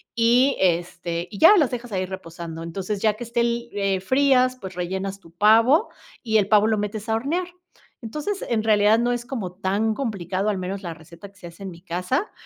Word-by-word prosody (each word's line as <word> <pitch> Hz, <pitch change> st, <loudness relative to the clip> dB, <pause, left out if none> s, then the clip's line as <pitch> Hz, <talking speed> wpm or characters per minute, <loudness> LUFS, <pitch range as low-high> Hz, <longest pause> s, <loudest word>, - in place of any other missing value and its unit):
y, 245 Hz, +4 st, +4 dB
este, 175 Hz, -1 st, -1 dB
y 200 Hz, -, -8 dB
ya 410 Hz, +6 st, +8 dB
las 295 Hz, -8 st, +3 dB
dejas 245 Hz, -1 st, -6 dB
ahí 185 Hz, -2 st, -1 dB
reposando, 170 Hz, -3 st, -8 dB
entonces 195 Hz, +4 st, -4 dB
ya 215 Hz, -2 st, +2 dB
que 230 Hz, -, -7 dB
esté 235 Hz, 0 st, 0 dB
li 235 Hz, 0 st, -2 dB
eh, 195 Hz, -2 st, 0 dB
frías, 255 Hz, +2 st, +3 dB
pues 190 Hz, -1 st, -8 dB
rellenas 190 Hz, +2 st, -4 dB
tu 170 Hz, -3 st, -18 dB
pavo 225 Hz, -, +4 dB, 0.3 s
y 220 Hz, -3 st, +2 dB
el 205 Hz, -2 st, +2 dB
pavo 210 Hz, 0 st, +4 dB
lo 220 Hz, -1 st, +1 dB
metes 210 Hz, +1 st, -4 dB
a 220 Hz, -, +2 dB
hornear. 315 Hz, +10 st, -1 dB, 0.5 s
Entonces, 300 Hz, -, -4 dB
en 225 Hz, -2 st, 0 dB
realidad 215 Hz, 0 st, +4 dB
no 240 Hz, +1 st, +1 dB
es 240 Hz, 0 st, -4 dB
como 215 Hz, -9 st, -5 dB
tan 200 Hz, +4 st, -1 dB
complicado, 195 Hz, -5 st, -2 dB
al 200 Hz, -3 st, -1 dB
menos 190 Hz, +2 st, -5 dB
la 170 Hz, -2 st, -5 dB
receta 165 Hz, +5 st, -13 dB
que 200 Hz, 0 st, -24 dB
se 175 Hz, -, -9 dB
hace 170 Hz, +3 st, -12 dB
en 190 Hz, -, -6 dB
mi 170 Hz, -1 st, -13 dB
casa, 180 Hz, -, -2 dB
210 Hz, 210 wpm, -23 LUFS, 185-235 Hz, 0.5 s, ya